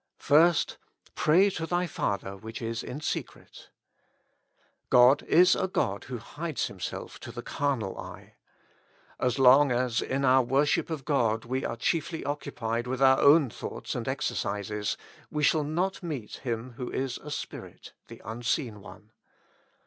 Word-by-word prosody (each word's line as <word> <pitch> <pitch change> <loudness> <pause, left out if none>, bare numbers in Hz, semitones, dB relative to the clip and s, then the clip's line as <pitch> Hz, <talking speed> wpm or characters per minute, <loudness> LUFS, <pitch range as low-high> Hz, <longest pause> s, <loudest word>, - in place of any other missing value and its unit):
First, 165 +3 +3 0.4
'■'Pray 185 +6 +4
to 160 0 -3
thy 175 +1 0
Father 100 - -3
which 110 +3 -8
is 115 -1 -3
in 145 +4 -7
secrety - - -6 1.2
God 125 +3 +6
is 180 +2 +6
a 190 - 0
God 100 - -1
who 125 -1 -5
hides 155 +6 -4
Himself 95 -3 -6
to - - -8
the - - -7
carnal 135 -9 -2
eye. - - -10 0.9
As 125 0 0
long 135 +1 +6
as 120 -1 +1
in 135 +1 -1
our 130 0 +6
worship 135 +7 +1
of 155 -5 -5
God 115 -6 +1
we 130 +3 -2
are 115 - -3
chiefly 160 +6 -1
occupied 120 -5 -3
with 130 0 -3
our 130 0 +6
own 145 -3 +6
thoughts - - -6
and - - -4
exercises, 105 +1 -2 0.3
we 150 -1 -2
shall 155 +1 +3
not 175 +6 -1
meet 145 - -5
Him 120 -1 -4
who 125 - -4
is 130 -1 -3
a 150 - -10
Spirit, 145 - -7
the - - -12
unseen 115 0 -2
One. 105 +2 -14
130 Hz, 150 wpm, -28 LUFS, 115-150 Hz, 1.2 s, God